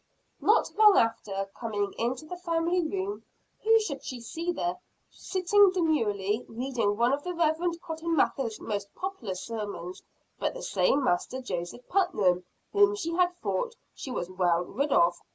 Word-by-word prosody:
Not 435 Hz, -, +3 dB
long 420 Hz, -2 st, +8 dB
after, 200 Hz, -4 st, 0 dB
coming 205 Hz, -4 st, -2 dB
into 250 Hz, +5 st, -2 dB
the 360 Hz, -, -6 dB
family 345 Hz, 0 st, 0 dB
room, 385 Hz, +5 st, -3 dB, 0.4 s
who 450 Hz, +1 st, +6 dB
should 300 Hz, -11 st, -4 dB
she 255 Hz, -, -6 dB
see 330 Hz, +9 st, -3 dB
there, 350 Hz, +1 st, -2 dB, 0.3 s
sitting 385 Hz, +2 st, +3 dB
demurely, 225 Hz, -, +1 dB
reading 230 Hz, -4 st, -1 dB
one 240 Hz, +3 st, +3 dB
of 285 Hz, +1 st, -1 dB
the 360 Hz, 0 st, -4 dB
Reverend 335 Hz, +1 st, +1 dB
Cotton 325 Hz, +1 st, -2 dB
Mather's 250 Hz, -6 st, +1 dB
most 200 Hz, -2 st, -4 dB
popular 370 Hz, -, -4 dB
sermons, 205 Hz, -4 st, -5 dB, 0.4 s
but -, -, -1 dB
the -, -, -7 dB
same 285 Hz, -, +2 dB
Master 250 Hz, +3 st, 0 dB
Joseph 190 Hz, 0 st, -5 dB
Putnam 205 Hz, -, +2 dB, 0.3 s
whom 410 Hz, 0 st, +5 dB
she 335 Hz, -5 st, -3 dB
had 355 Hz, 0 st, +2 dB
thought 480 Hz, -2 st, -1 dB, 0.2 s
she -, -, -8 dB
was 175 Hz, -8 st, -3 dB
well 180 Hz, -2 st, +1 dB
rid 280 Hz, +10 st, -2 dB
of. 175 Hz, -5 st, +3 dB
280 Hz, 155 wpm, -28 LUFS, -, 0.4 s, long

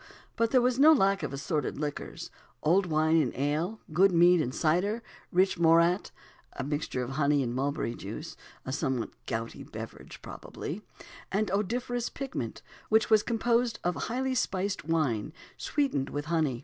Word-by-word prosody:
But 230 Hz, -1 st, +2 dB
there 255 Hz, 0 st, +4 dB
was 250 Hz, +1 st, +1 dB
no 305 Hz, +3 st, +8 dB
lack 195 Hz, -7 st, +3 dB
of 150 Hz, -, -3 dB
assorted 140 Hz, +1 st, -2 dB
liquors 145 Hz, 0 st, -5 dB, 0.3 s
old 180 Hz, +5 st, +3 dB
wine 160 Hz, 0 st, +3 dB
and 130 Hz, -, -2 dB
ale, 155 Hz, -, -1 dB
good 190 Hz, +4 st, +5 dB
mead 175 Hz, 0 st, +5 dB
and 125 Hz, -, -2 dB
cider, 180 Hz, -, +1 dB, 0.3 s
rich 185 Hz, 0 st, +2 dB
morat 170 Hz, +3 st, +4 dB, 0.4 s
(a -, -, -4 dB
mixture 145 Hz, -3 st, -2 dB
of 125 Hz, -, -5 dB
honey 145 Hz, 0 st, +2 dB
and 120 Hz, -1 st, -2 dB
mulberry 135 Hz, -2 st, -1 dB
juice, -, -, -7 dB, 0.3 s
a 130 Hz, -, -3 dB
somewhat 130 Hz, -3 st, -1 dB, 0.2 s
gouty 115 Hz, +1 st, -4 dB
beverage, -, -, -9 dB
probably), 175 Hz, +8 st, -7 dB, 0.5 s
and 205 Hz, 0 st, 0 dB
odoriferous 240 Hz, +4 st, -1 dB
pigment 255 Hz, -, -5 dB, 0.3 s
which 220 Hz, +1 st, +3 dB
was 215 Hz, -1 st, +7 dB
composed 235 Hz, 0 st, +1 dB
of 175 Hz, -, +1 dB
highly 260 Hz, +7 st, -2 dB
spiced 200 Hz, -4 st, -1 dB
wine, 155 Hz, -6 st, 0 dB, 0.2 s
sweetened 270 Hz, -, -1 dB
with 145 Hz, 0 st, -4 dB
honey. 155 Hz, -6 st, 0 dB
170 Hz, 155 wpm, -29 LUFS, 145-215 Hz, 0.5 s, no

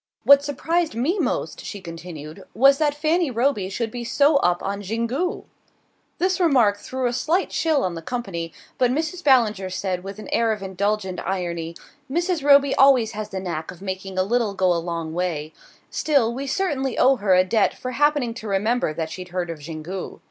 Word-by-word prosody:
"What 280 Hz, 0 st, +7 dB
surprised 320 Hz, +3 st, -1 dB
me 305 Hz, -, 0 dB
most," -, -, -2 dB
she 205 Hz, -, -6 dB
continued, 165 Hz, -3 st, -9 dB
"was 275 Hz, +5 st, +5 dB
that 295 Hz, -2 st, +1 dB
Fanny 315 Hz, +2 st, +1 dB
Roby 235 Hz, -5 st, 0 dB
should 225 Hz, +3 st, -3 dB
be 240 Hz, 0 st, -5 dB
so 285 Hz, +5 st, +3 dB
up 175 Hz, -8 st, +1 dB
on 200 Hz, +1 st, -3 dB
Xingu." 235 Hz, -, -2 dB, 0.7 s
This 370 Hz, +1 st, +1 dB
remark 250 Hz, -, +4 dB
threw 260 Hz, +5 st, -4 dB
a 240 Hz, -, +1 dB
slight 315 Hz, +9 st, 0 dB
chill 315 Hz, -4 st, +1 dB
on 180 Hz, -, -1 dB
the 165 Hz, -, -6 dB
company, 175 Hz, -6 st, -4 dB, 0.3 s
but 250 Hz, -, +4 dB
Mrs. 320 Hz, +6 st, -2 dB
Ballinger 220 Hz, -9 st, +3 dB
said 185 Hz, -1 st, -3 dB
with 195 Hz, +1 st, -7 dB
an 215 Hz, -, -9 dB
air 230 Hz, -1 st, +2 dB
of 210 Hz, -2 st, -7 dB
indulgent 190 Hz, 0 st, -2 dB
irony: 170 Hz, -3 st, -3 dB, 0.3 s
"Mrs. 345 Hz, +1 st, -1 dB
Roby 280 Hz, -1 st, +6 dB
always 260 Hz, -5 st, +5 dB
has 215 Hz, -1 st, -5 dB
the 190 Hz, -, -4 dB
knack 170 Hz, -4 st, -4 dB
of 175 Hz, -, -9 dB
making 190 Hz, 0 st, -5 dB
a 185 Hz, -, +3 dB
little 220 Hz, 0 st, 0 dB
go 185 Hz, -1 st, +3 dB
a 170 Hz, -, -1 dB
long 165 Hz, -2 st, -4 dB
way; 160 Hz, -3 st, -2 dB, 0.4 s
still, 275 Hz, -7 st, +2 dB
we 275 Hz, +3 st, -5 dB
certainly 270 Hz, -7 st, -1 dB
owe 265 Hz, +1 st, +5 dB
her 200 Hz, -4 st, +3 dB
a 185 Hz, -, +5 dB
debt 215 Hz, +4 st, +1 dB
for 255 Hz, -, -5 dB
happening 290 Hz, -2 st, +1 dB
to 225 Hz, -1 st, -8 dB
remember 205 Hz, -3 st, 0 dB
that 160 Hz, -1 st, -3 dB
she'd 185 Hz, -1 st, -7 dB
heard 175 Hz, -1 st, -3 dB
of 155 Hz, -3 st, -8 dB
Xingu." 165 Hz, +4 st, -6 dB
220 Hz, 190 wpm, -23 LUFS, 185-275 Hz, 0.7 s, What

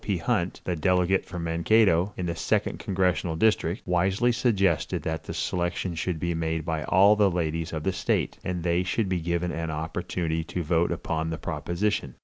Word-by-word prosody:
P. 100 Hz, -3 st, 0 dB
Hunt, 85 Hz, +1 st, -1 dB
the 90 Hz, -, -1 dB
delegate 90 Hz, +3 st, +2 dB
from 90 Hz, -2 st, -5 dB
Mankato, 85 Hz, +2 st, +3 dB
in 90 Hz, -, -2 dB
the 85 Hz, -1 st, -2 dB
second -, -, 0 dB
congressional 90 Hz, -3 st, 0 dB
district, 95 Hz, -1 st, +1 dB
wisely 95 Hz, +7 st, +2 dB
suggested 100 Hz, -, +1 dB
that 80 Hz, 0 st, -3 dB
the -, -, -5 dB
selection 90 Hz, 0 st, -1 dB
should 80 Hz, +1 st, -2 dB
be 85 Hz, +2 st, -1 dB
made 80 Hz, -1 st, -2 dB
by 80 Hz, -2 st, -2 dB
all 100 Hz, +3 st, +5 dB
the 105 Hz, -2 st, +4 dB
ladies 80 Hz, -2 st, -2 dB
of 80 Hz, -2 st, -4 dB
the 95 Hz, -, 0 dB
state, 90 Hz, -, -1 dB
and 90 Hz, -2 st, -3 dB
they 85 Hz, 0 st, +2 dB
should 95 Hz, +3 st, -1 dB
be 90 Hz, -2 st, 0 dB
given 85 Hz, +1 st, -1 dB
an 80 Hz, 0 st, -3 dB
opportunity 80 Hz, +1 st, -2 dB
to 85 Hz, +2 st, -4 dB
vote 85 Hz, +2 st, +1 dB
upon 80 Hz, 0 st, -2 dB
the 80 Hz, -, -3 dB
proposition. 85 Hz, -, -2 dB
85 Hz, 185 wpm, -26 LUFS, 80-95 Hz, -, all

